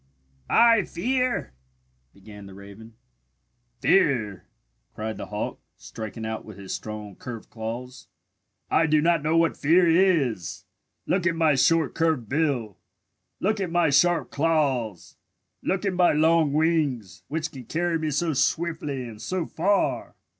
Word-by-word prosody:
"I 230 -2 +6
fear 250 - -1 0.3
" 65 0 -43
began 100 0 -12
the 95 - -12
raven. 100 +3 -13 0.9
"Fear?" 115 - +2 0.5
cried 110 0 -4
the - - -6
hawk, 105 0 -4 0.2
striking 110 0 -7
out 110 0 -4
with 110 -3 -12
his 95 -1 -7
strong 105 +1 -7
curved 120 -3 -9
claws. 120 +3 -7 0.6
"I 165 - +3
do 155 0 +3
not 165 0 +2
know 155 +3 +1
what 165 0 +2
fear 170 +4 +4
is! 165 - +1 0.4
Look 180 -2 +1
at 170 - +1
my 160 -2 +3
short 160 +3 +2
curved 160 -8 0
bill! 130 - -1 0.6
Look 215 +2 0
at 190 -3 -2
my 170 -3 +2
sharp 175 +4 +3
claws! 135 - -1 0.4
Look 190 +2 -1
at 195 - 0
my 180 -1 +4
long 160 0 +3
wings, 140 - 0
which 160 +1 -3
can 130 -3 -10
carry 170 +3 -1
me 155 -1 -2
so 155 +3 0
swiftly 145 -2 -1
and 110 -2 -11
so 185 -3 -2
far! 195 +7 0
150 Hz, 145 wpm, -25 LUFS, 110-165 Hz, 0.9 s, I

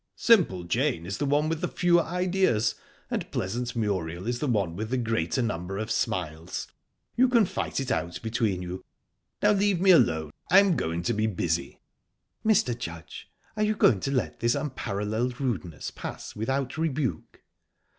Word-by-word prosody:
"Simple 170 - +4
Jane 115 - 0
is 95 +1 -4
the 145 - 0
one 145 +2 +2
with 160 0 -2
the 180 - 0
fewer 175 -1 +3
ideas, 180 - +1 0.4
and - - -2
pleasant 120 +6 -3
Muriel 95 -5 -2
is 120 +1 -1
the 150 - -1
one 100 -9 0
with 110 +3 -4
the 130 - 0
greater 115 -2 0
number 95 -3 -3
of 110 +2 -3
smiles. 80 -5 -2 0.5
You 255 +1 +4
can 235 -4 +5
fight - - -3
it 135 -1 -2
out 85 -6 -2
between 110 -5 0
you...Now 90 - -4
leave 200 -3 +2
me 190 +1 +6
alone. 80 - +4 0.2
I'm 195 -1 +6
going 85 - -2
to 120 - +1
be 110 +1 +1
busy." 85 -7 -2 0.7
"Mr. 205 - +3
Judge, 85 -8 -8 0.3
are 215 - -2
you 215 0 +2
going 120 - +4
to 135 - -2
let 110 - -1
this 120 +1 +2
unparalleled 120 -3 -2
rudeness 90 - -3
pass - - -7
without 130 +6 -2
rebuke?" 155 -5 -2
120 Hz, 165 wpm, -27 LUFS, 95-155 Hz, 0.7 s, me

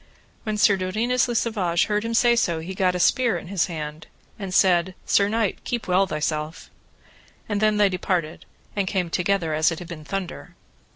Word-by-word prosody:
When 215 -1 -2
Sir 200 -1 +4
Dodinas 225 +8 0
le 240 - -3
Savage 190 -8 +1
heard 210 0 -1
him 230 0 -2
say 240 0 +4
so 170 -8 +1
he 170 +4 -6
gat 185 -1 +1
a - - -1
spear 230 +3 +3
in 170 - -9
his 190 -3 +1
hand, 155 -2 -6 0.3
and 195 -2 -5
said, 185 -1 +3
Sir 200 0 +3
knight, 220 -2 -1
keep 240 -2 -3
well 185 +2 +3
thyself: 155 0 -3 0.8
And 205 -1 -1
then 215 -1 +3
they 205 -1 +4
departed 180 -3 -2 0.3
and 200 -2 0
came 180 -3 -1
together 180 -3 0
as 155 +2 +3
it 165 - -4
had 175 - -8
been 165 -3 -8
thunder. 190 +2 -6
185 Hz, 190 wpm, -24 LUFS, 170-210 Hz, 0.8 s, Sir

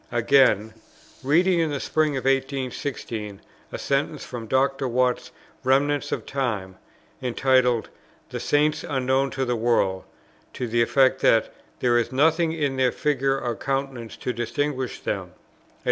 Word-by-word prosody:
Again: 120 -3 +3 0.5
"Reading 170 +6 +3
in 165 -1 +1
the 145 -2 -2
Spring 155 0 0
of 130 - -5
1816 130 -6 -2 0.3
a - - -4
sentence 140 +1 -1
from 120 -3 -7
[Dr. 135 +2 +1
Watts's] 125 0 0 0.3
'Remnants 140 +2 +2
of - - -3
Time,' 105 -9 -3 0.4
entitled 125 -1 +2 0.4
'the - - -4
Saints 150 +1 +1
unknown 130 0 0
to 130 0 -2
the 125 -1 0
world,' 110 -5 +1 0.5
to 125 - -3
the 120 +1 +1
effect, 130 +2 +3
that 115 - +3 0.3
'there 120 -1 +3
is 120 - -2
nothing 160 +5 +3
in 145 -5 -1
their 130 -1 +3
figure 135 -1 0
or 120 -3 -2
countenance 135 -4 -3
to 125 - -3
distinguish 130 +2 -2
them,' - - -4
&c. - - -32
130 Hz, 145 wpm, -24 LUFS, 120-140 Hz, 0.5 s, Again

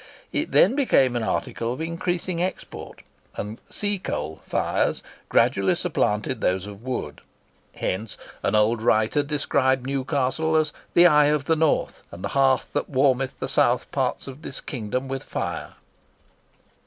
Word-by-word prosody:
It - - -2
then - - +5
became 135 - +3
an 120 - 0
article 115 +3 -2
of 130 - -8
increasing 170 +1 -2
export, 185 +1 -5 0.3
and 105 +2 -6
"seacoal" 200 - -2
fires - - 0 0.3
gradually 100 - +3
supplanted 130 -9 -1
those 90 +1 +1
of 105 0 -10
wood. 130 0 -4 0.5
Hence 100 +3 -3 0.2
an 105 - +1
old 110 +2 +3
writer 110 +5 +3
described 135 -3 +1
Newcastle 140 +3 0
as 155 -1 +2 0.2
"the 175 - +8
Eye 150 -4 +6
of 150 -1 +1
the 160 - +3
North, 160 -1 +1
and 85 +2 -9
the - - -2
Hearth 135 -1 +2
that - - -1
warmeth 135 -1 +2
the - - -2
South 125 -2 +2
parts 130 -3 -1
of 135 +2 -9
this - - -7
kingdom 125 0 -4
with 135 0 -3
Fire." - - -4
135 Hz, 145 wpm, -24 LUFS, 115-155 Hz, 0.5 s, the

